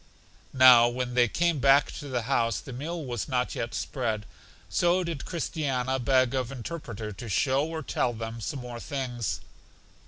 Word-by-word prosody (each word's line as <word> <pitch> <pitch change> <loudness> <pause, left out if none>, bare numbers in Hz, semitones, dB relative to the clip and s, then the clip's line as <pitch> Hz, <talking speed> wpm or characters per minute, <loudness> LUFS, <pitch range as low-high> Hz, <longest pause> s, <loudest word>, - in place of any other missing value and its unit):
Now 125 -2 +8
when 125 0 -3
they 120 -1 +4
came 170 +5 +1
back 135 +2 +5
to 145 - -7
the 125 -3 -2
house 115 -3 +1
the 135 - -9
meal 155 +5 -4
was 120 -5 -3
not 125 -2 0
yet 115 - -4
spread, 110 -6 -2 0.4
so 175 +1 +2
did 165 -5 -4
Christiana 135 -6 -1
beg 130 0 +3
of 130 -2 -1
Interpreter 115 -6 -6
to 110 +3 -8
show 135 +7 +2
or 160 -1 -5
tell 125 - 0
them 115 0 -6
some 135 +5 -4
more 120 -1 -7
things. 125 -6 -3
130 Hz, 165 wpm, -27 LUFS, 120-140 Hz, 0.4 s, Now